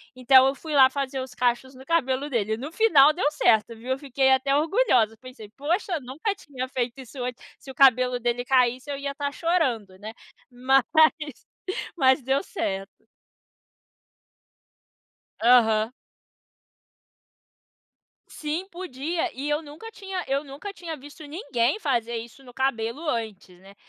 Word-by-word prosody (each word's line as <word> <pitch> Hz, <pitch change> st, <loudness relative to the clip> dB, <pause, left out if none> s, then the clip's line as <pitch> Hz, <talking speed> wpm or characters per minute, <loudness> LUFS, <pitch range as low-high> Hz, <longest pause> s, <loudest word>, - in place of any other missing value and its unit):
Então, 260 Hz, +1 st, +6 dB
eu 270 Hz, -, 0 dB
fui 315 Hz, +2 st, -7 dB
lá 265 Hz, -2 st, +7 dB
fazer 270 Hz, -1 st, -3 dB
os 260 Hz, -1 st, -8 dB
cachos 250 Hz, +2 st, -1 dB
no 265 Hz, +1 st, -13 dB
cabelo 275 Hz, -3 st, 0 dB
dele. 220 Hz, -5 st, -1 dB
No 280 Hz, +6 st, -7 dB
final, 315 Hz, -9 st, +5 dB
deu 345 Hz, -3 st, +1 dB
certo, 225 Hz, -5 st, +2 dB
viu. 235 Hz, +3 st, -11 dB
Eu 260 Hz, -, -1 dB
fiquei 265 Hz, -1 st, +1 dB
até 270 Hz, +1 st, +2 dB
orgulhosa. 290 Hz, -, +2 dB
Pensei: 255 Hz, -5 st, -12 dB
"Poxa, 335 Hz, +4 st, -1 dB
nunca 275 Hz, -, -3 dB
tinha 265 Hz, -9 st, -7 dB
feito 250 Hz, 0 st, -3 dB
isso 255 Hz, +1 st, -10 dB
antes". 250 Hz, 0 st, -5 dB, 0.2 s
Se -, -, -14 dB
o 265 Hz, -, -9 dB
cabelo 255 Hz, -1 st, +4 dB
dele 240 Hz, +1 st, -1 dB
caísse, 255 Hz, +1 st, +2 dB
eu 280 Hz, -, -3 dB
ia 280 Hz, 0 st, -4 dB
estar 285 Hz, 0 st, -3 dB
chorando, 255 Hz, -, -1 dB
né. 215 Hz, +2 st, -8 dB, 0.4 s
Mas, 255 Hz, +2 st, +2 dB, 1.1 s
mas, 265 Hz, -1 st, +4 dB
deu 270 Hz, +2 st, 0 dB
certo. 195 Hz, -, -3 dB, 2.6 s
Aham. 225 Hz, -2 st, +4 dB, 2.4 s
Sim, 315 Hz, +5 st, -4 dB
podia. 335 Hz, -2 st, -3 dB
E, 275 Hz, +3 st, -5 dB
eu 295 Hz, +1 st, 0 dB
nunca 315 Hz, +9 st, -11 dB
tinha 385 Hz, -4 st, -6 dB
eu 275 Hz, +2 st, 0 dB
nunca 290 Hz, +8 st, -8 dB
tinha 335 Hz, -4 st, -7 dB
visto 290 Hz, +3 st, -13 dB
ninguém 285 Hz, -, -1 dB
fazer 235 Hz, -, -1 dB
isso 235 Hz, +4 st, -10 dB
no 245 Hz, -2 st, -14 dB
cabelo, 265 Hz, +3 st, -2 dB
antes, 215 Hz, -8 st, -4 dB
né. 195 Hz, +2 st, -17 dB
265 Hz, 145 wpm, -25 LUFS, 245-295 Hz, 2.6 s, lá